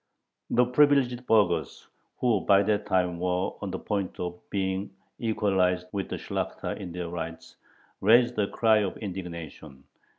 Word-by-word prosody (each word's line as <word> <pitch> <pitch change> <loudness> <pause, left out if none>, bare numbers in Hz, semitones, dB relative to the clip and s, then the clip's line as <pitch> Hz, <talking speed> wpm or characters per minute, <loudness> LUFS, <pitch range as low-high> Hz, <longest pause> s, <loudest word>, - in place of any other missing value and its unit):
The 125 - +4
privileged 125 -2 +3
burghers, 105 -6 +1 0.3
who 120 -5 +2
by 100 0 +4
that 105 0 0
time 90 -2 +1
were 90 +1 0
on - - -3
the - - -3
point 100 -3 -3
of 90 0 -4
being 95 0 -2 0.3
equalized 95 -5 +1
with 100 -2 -3
the - - -3
Shlakhta - - -4
in 90 -3 -6
their 90 0 -4
rights, 85 -1 -7 0.5
raised 120 +4 +5
a 100 - +2
cry 110 0 +3
of 100 -3 -2
indignation. 85 -7 -7
95 Hz, 145 wpm, -27 LUFS, 90-110 Hz, 0.5 s, raised